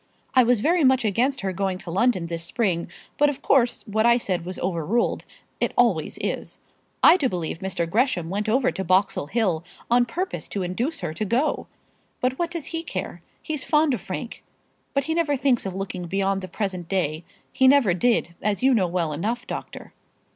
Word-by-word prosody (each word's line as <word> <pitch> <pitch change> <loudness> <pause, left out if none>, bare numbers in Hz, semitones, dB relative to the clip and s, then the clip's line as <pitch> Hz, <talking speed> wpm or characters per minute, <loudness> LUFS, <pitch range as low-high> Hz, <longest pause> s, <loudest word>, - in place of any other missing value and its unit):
I 260 - +7
was 240 -2 +3
very 335 +5 +3
much 260 -2 +4
against 250 +7 +1
her 190 -2 -2
going 190 0 -1
to 175 - -8
London 195 -1 +2
this 165 0 -3
spring, 175 -3 -1 0.3
but 295 0 +5
of 285 - -6
course 245 -3 +2
what 220 0 0
I 235 +1 +5
said 185 -7 -2
was 185 +1 -6
overruled. 180 +6 -1 0.3
It - - -1
always - - +2
is. - - -3 0.5
I 360 - +8
do 275 -7 +1
believe 165 -4 -3
Mr. 185 -3 -2
Gresham 205 -3 +1
went 205 +5 -2
over 255 +3 +2
to 190 - -4
Boxall 185 -4 +1
Hill, 185 -6 0 0.3
on 240 0 +4
purpose 365 +10 -3
to 200 - -3
induce 240 - -2
her 155 - -3
to 165 - -3
go. 235 +9 0 0.5
But 255 +1 -1
what 340 -1 0
does 335 -1 -5
he 330 - -1
care? 335 - -5 0.2
He's 305 -4 -2
fond 305 -2 +3
of 230 - -3
Frank; 230 +6 -6 0.5
but 275 - +2
he 320 - -1
never 325 -3 +1
thinks 250 -5 +1
of 185 - -5
looking 190 -2 -4
beyond 195 +1 0
the 185 - -6
present 185 -2 -4
day. 165 -4 -1 0.3
He 260 - +4
never 260 -9 +5
did, 185 -2 +1
as 210 +2 -1
you 265 0 +5
know 195 -6 +2
well 170 -3 -1
enough, 230 +10 -2
doctor." - - -7
215 Hz, 200 wpm, -24 LUFS, 185-260 Hz, 0.5 s, I